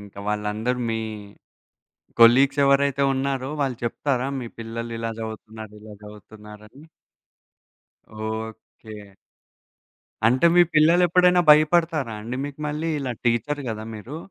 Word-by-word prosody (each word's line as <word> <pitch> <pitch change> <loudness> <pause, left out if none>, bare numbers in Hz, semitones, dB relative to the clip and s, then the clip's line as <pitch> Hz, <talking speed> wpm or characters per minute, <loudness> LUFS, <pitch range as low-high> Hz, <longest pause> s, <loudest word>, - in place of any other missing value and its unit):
ఇంక 100 -1 -14
వాళ్ళందరూ 105 +4 -2
మీ, 115 - -1 1.2
కొలీగ్స్ 135 +4 +6
ఎవరైతే 140 0 +2
ఉన్నారో 135 0 -2
వాళ్ళు 130 -4 -3
చెప్తారా? 130 +2 -2
మీ 120 - -6
పిల్లలు 115 +1 -6
ఇలా 115 0 -3
చదువుతున్నారు, 110 -1 -9
ఇలా 110 -1 -11
చదువుతున్నారని. 105 +3 -14 1.3
ఓకే. 110 -1 -8 1.1
అంటే 130 +7 +3
మీ 175 - +8
పిల్లలు 165 +4 +5
ఎప్పుడైనా 180 +1 +4
భయపడతారా 155 -4 +3
అండి 115 +4 -6
మీకు 145 0 -8
మళ్ళీ, 155 +2 -3
ఇలా 130 -3 -3
టీచ్చరు 140 +5 0
కదా! 110 0 -6
మీరు? 115 +8 -8
120 Hz, 115 wpm, -23 LUFS, 110-140 Hz, 1.3 s, మీ